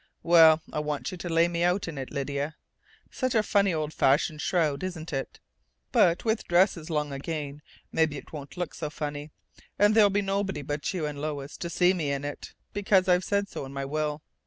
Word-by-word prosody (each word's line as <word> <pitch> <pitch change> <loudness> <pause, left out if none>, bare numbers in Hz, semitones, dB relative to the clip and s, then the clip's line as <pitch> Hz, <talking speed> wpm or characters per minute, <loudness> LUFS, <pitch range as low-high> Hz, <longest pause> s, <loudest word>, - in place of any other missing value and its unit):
Well, 160 -2 +7
I - - -1
want 150 -1 -3
you 185 - -6
to 175 - -5
lay 165 +1 +4
me 170 -1 -2
out 180 +2 +1
in 155 -4 -5
it, 130 - -5
Lydia. 140 +1 -3 0.6
Such 255 -2 -1
a 220 - +4
funny 200 -2 +2
old 155 -2 -2
fashioned 150 +3 +2
shroud, 155 -6 +1
isn't 170 -4 -5
it?... 135 -1 -4 0.5
But 170 +4 +3
with 220 0 0
dresses 175 -2 +2
long 150 -2 -1
again, 145 0 -5 0.3
maybe 160 -2 +1
it - - -12
won't 145 +2 -8
look 180 -1 -3
so 150 - -4
funny, 150 -1 -5 0.5
and 205 +1 +5
there'll 215 -2 +6
be 200 +1 +1
nobody 195 -5 -1
but 145 +1 -3
you 180 -5 -2
and 145 -1 -5
Lois 145 -2 -4
to 170 - -4
see 180 +1 +3
me 155 -6 -1
in 140 0 -2
it, 145 - -7 0.2
because 195 -2 +3
I've 180 0 +4
said 200 +1 0
so - - -6
in 135 0 -8
my 140 0 -3
will. 150 +1 -2
160 Hz, 205 wpm, -27 LUFS, 145-185 Hz, 0.6 s, Well